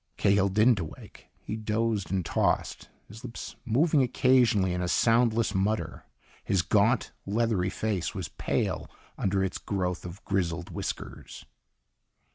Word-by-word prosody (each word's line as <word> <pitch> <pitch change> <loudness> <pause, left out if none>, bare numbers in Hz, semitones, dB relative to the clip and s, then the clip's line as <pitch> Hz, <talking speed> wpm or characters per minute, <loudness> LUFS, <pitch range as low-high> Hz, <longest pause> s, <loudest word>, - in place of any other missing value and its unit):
Cahill 100 0 +3
didn't 110 +3 +4
awake. 80 -3 -9 0.2
He 110 - -4
dozed 110 -3 -1
and 95 -2 -1
tossed, - - 0 0.2
his 110 +2 -12
lips 115 - -7
moving 145 +6 +3
occasionally 125 -7 +3
in 90 - -2
a 90 - -1
soundless 115 +2 +3
mutter. 105 +3 -1 0.4
His 95 -3 +1
gaunt, 105 +7 +2 0.2
leathery 105 -3 +1
face 100 -3 -2
was - - -3
pale - - -2 0.3
under 95 0 0
its 95 - -2
growth 90 -3 -2
of 90 +2 -9
grizzled 85 -3 -1
whiskers. - - -6
100 Hz, 130 wpm, -28 LUFS, 95-115 Hz, 0.4 s, didn't